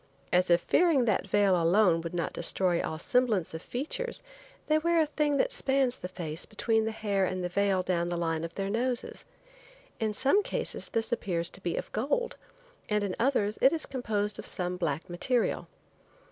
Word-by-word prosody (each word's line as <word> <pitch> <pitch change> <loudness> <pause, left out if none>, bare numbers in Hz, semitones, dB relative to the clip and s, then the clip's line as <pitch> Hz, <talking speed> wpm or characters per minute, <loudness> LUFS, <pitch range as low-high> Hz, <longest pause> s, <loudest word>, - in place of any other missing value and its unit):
As 180 +1 +3
if 170 0 +4
fearing 310 - +3
that 215 -4 +2
the - - -17
veil 195 -4 +3
alone 170 0 +3
would 170 +1 -6
not 170 - -2
destroy 180 -3 +1
all 160 - -4
semblance 215 -2 +1
of 160 - -6
features 315 - -3 0.4
they 310 0 +2
wear 340 +1 +2
a 315 - +4
thing 295 -1 0
that - - +1
spans 270 - +4
the - - -6
face 165 -3 -2
between 220 +1 0
the 220 - -1
hair 205 -3 -1
and 185 0 -2
the 180 - -2
veil 195 0 +1
down 175 -1 -1
the 175 - -2
line 165 -1 -1
of 165 - -6
their 195 0 -2
noses. 245 +2 -2 0.7
In 220 -1 0
some 275 - +3
cases - - -3
this 225 -1 -1
appears 175 -7 -1
to 190 - -12
be 175 -2 -2
of - - -5
gold, 295 - -1 0.5
and 210 -1 +1
in 195 -2 -2
others 225 -5 +1
it 265 - +6
is 325 -2 -2
composed 215 -5 -2
of - - -7
some 180 0 -1
black 165 -4 -2
material. 230 +8 -1
205 Hz, 195 wpm, -29 LUFS, 175-255 Hz, 0.7 s, it